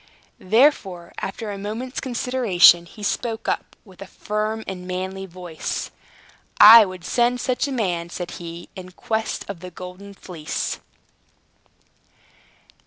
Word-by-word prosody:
Therefore, 195 - +2
after 205 +2 -5
a 200 - -6
moment's 225 +6 -5
consideration, 235 -9 +4
he 210 +4 -12
spoke 225 +2 -2
up, - - -2
with 190 -2 -17
a 195 - -8
firm 215 +2 -3
and 180 -1 -7
manly 190 +1 -4
voice. 175 -3 -5 0.7
"I 220 +1 +11
would 185 -1 -9
send 245 +3 +1
such 255 +1 -1
a - - -4
man," 180 -9 -2
said 175 0 -6
he, 170 0 -8
"in 185 -1 -10
quest 220 +3 -3
of 200 -4 -6
the 180 +1 -8
Golden 180 +3 -10
Fleece!" 165 -5 -4
195 Hz, 130 wpm, -22 LUFS, 180-225 Hz, 0.7 s, I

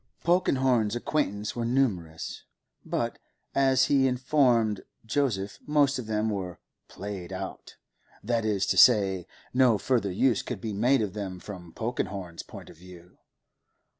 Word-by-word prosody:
Polkenhorne's 130 - +2
acquaintances 105 -6 -1
were 120 - -2
numerous, 105 -11 -1 0.4
but, - - -2 0.3
as 135 -1 +4
he 135 -2 +3
informed 125 -5 +2 0.2
Joseph, 110 -6 -1
most 145 -3 +3
of 120 - -6
them 110 0 0
were 95 -4 -4 0.3
'played 95 -3 -7
out,' 95 0 -7 0.5
that 115 +1 0
is 105 -3 +1
to - - 0
say, 95 -7 +5 0.3
no 125 -4 +4
further 110 -3 0
use 120 +6 +2
could 125 -5 -5
be 110 +1 -4
made 120 +4 +3
of 100 - -3
them 95 -3 -5
from 90 -3 -9
Polkenhorne's 95 -6 -4
point - - -11
of - - -17
view. 90 0 -15
110 Hz, 135 wpm, -27 LUFS, 95-130 Hz, 0.5 s, say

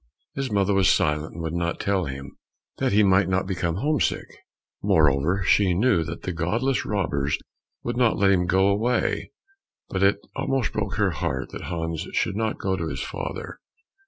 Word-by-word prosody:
His 135 -1 -3
mother 100 -1 +2
was 95 -2 +4
silent 75 +1 +1
and 85 - -5
would 80 0 -3
not 85 0 -1
tell 95 -3 0
him, 70 0 -7 0.4
that - - +1
he 105 +2 +5
might 95 -1 +4
not 95 0 +1
become 90 -3 -2
home 145 +9 0
sick; - - 0 0.6
moreover 80 +5 +3
she 95 -2 +4
knew 105 -4 +3
that 85 +1 -7
the 95 - -2
godless 110 +11 0
robbers 75 -9 0 0.5
would 120 0 -3
not 120 -3 +3
let 100 -1 +4
him 90 -2 +2
go 95 +2 +3
away, 115 +5 0 0.6
but 95 - -2
it 100 +1 +4 0.2
almost 135 -3 -1
broke 100 -2 -2
her 100 -3 +2
heart 80 -7 -3
that - - -7
Hans 80 -2 -3
should - - 0
not 110 0 -1
go 95 -1 -1
to 85 -3 -3
his 70 -4 -4
father. - - -6
95 Hz, 185 wpm, -24 LUFS, 85-105 Hz, 0.6 s, he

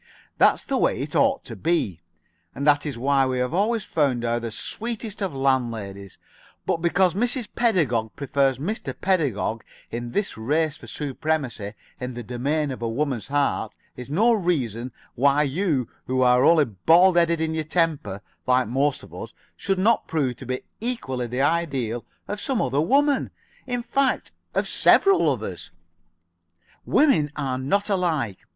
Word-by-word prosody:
That's - - +4
the - - -1
way - - +1
it - - -5
ought - - +2
to - - -8
be, 150 - -1 0.5
and 140 - -3
that 145 0 +3
is 140 -5 -4
why 135 +2 +2
we 130 -1 -1
have 125 +2 -1
always 215 +4 +1
found 140 -9 0
her 120 0 0
the 115 0 -4
sweetest 220 - -3
of 195 -3 -1
landladies, 115 -8 -2 0.5
but - - +1
because 175 +1 +3
Mrs. 240 +3 -1
Pedagog 145 - +1
prefers 140 -2 +1
Mr. 190 - -4
Pedagog 140 - 0 0.3
in 120 0 -5
this 205 - -2
race 150 +6 0
for - - -13
supremacy 140 -7 -3 0.3
in 125 -1 -5
the 120 - -6
domain 140 +6 -1
of 130 - -7
a 115 - -1
woman's 125 -2 -2
heart 140 -5 0 0.2
is 125 0 -8
no 220 +11 +3
reason 130 - -1 0.2
why 140 +3 +3
you 145 - 0 0.2
who 130 0 +1
are 125 0 +5
only 160 -3 +6
bald 165 - +4
headed 170 -1 +3
in 160 0 -1
your 160 0 -1
temper, 155 - -1 0.2
like 125 -1 +3
most 135 +4 0
of - - -14
us, - - -8 0.2
should 195 +2 -1
not 220 +5 +2
prove 140 -6 0
to 130 - -10
be 130 0 -2 0.2
equally 130 - -2
the 125 +3 -2
ideal 135 -7 0 0.2
of 205 0 -4
some 265 -4 0
other 135 -1 +1
woman 280 - +2 0.4
in 245 -1 -2
fact, 270 +1 0 0.2
of - - +1
several 390 - +4
others. 105 -10 -4 1.2
Women 255 - +3
are 135 -3 -2
not 200 +10 0
all 195 - +3
alike. 145 - -1
145 Hz, 165 wpm, -24 LUFS, 125-180 Hz, 1.2 s, only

